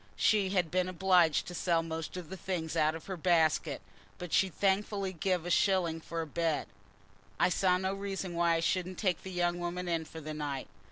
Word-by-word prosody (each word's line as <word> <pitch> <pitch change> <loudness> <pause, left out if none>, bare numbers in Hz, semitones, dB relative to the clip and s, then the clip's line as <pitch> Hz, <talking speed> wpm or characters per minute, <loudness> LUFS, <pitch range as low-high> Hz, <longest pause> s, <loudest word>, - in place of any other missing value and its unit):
She 205 -3 +3
had 180 -5 0
been 185 0 +1
obliged 180 -3 +3
to 180 - -7
sell 170 -1 +1
most 165 +1 -5
of 175 -4 -7
the - - -4
things 175 -4 -3
out 155 +1 +2
of 160 - -9
her 190 - -4
basket, 165 -2 +2 0.3
but 180 -2 -7
she'd 190 -3 +2
thankfully 195 0 0
give 180 0 -1
a 175 - -2
shilling 175 -4 +2
for 165 +1 -4
a - - -6
bed. 160 0 -1 0.7
I - - +4
saw 180 0 +3
no 190 +1 -1
reason 195 -2 -4
why 170 0 +3
I 165 - 0
shouldn't 185 +1 -1
take 185 -6 0
the 190 - -8
young 175 -1 0
woman 175 +1 -3
in 165 -2 -1
for 160 - -9
the 155 0 -6
night. 145 -3 -4
175 Hz, 210 wpm, -31 LUFS, 165-190 Hz, 0.7 s, I